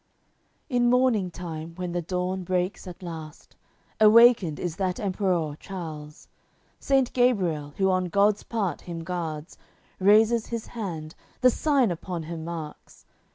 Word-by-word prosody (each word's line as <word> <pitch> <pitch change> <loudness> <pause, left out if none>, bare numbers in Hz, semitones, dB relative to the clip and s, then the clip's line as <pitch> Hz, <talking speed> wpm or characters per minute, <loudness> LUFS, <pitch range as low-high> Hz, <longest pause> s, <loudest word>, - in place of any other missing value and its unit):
AOI. - - -44
CCIII 260 - -14
In 240 0 +4
morning 245 -7 +3
time, 165 -2 -7
when 180 -1 -4
the 175 0 -1
dawn 180 +2 -2
breaks 180 +2 -2
at 180 +1 -10
last, 160 -3 -9 0.4
Awakened 220 -6 +6
is 175 -1 -4
that 185 -2 -1
Emperour 185 -6 -1
Charles. 155 -5 -8 0.5
Saint 270 -2 +1
Gabriel, 180 - +1
who 190 -1 +3
on 185 0 +1
God's 200 +3 +2
part 210 -7 -2
him 170 -2 -7
guards, 165 -2 -5 0.4
Raises 215 +4 +4
his 230 -2 -4
hand, 170 -9 -6 0.3
the 255 0 +6
Sign 275 - +2
upon 175 0 -5
him 160 0 -6
marks. 160 -2 -8
185 Hz, 145 wpm, -26 LUFS, 165-215 Hz, 0.5 s, Awakened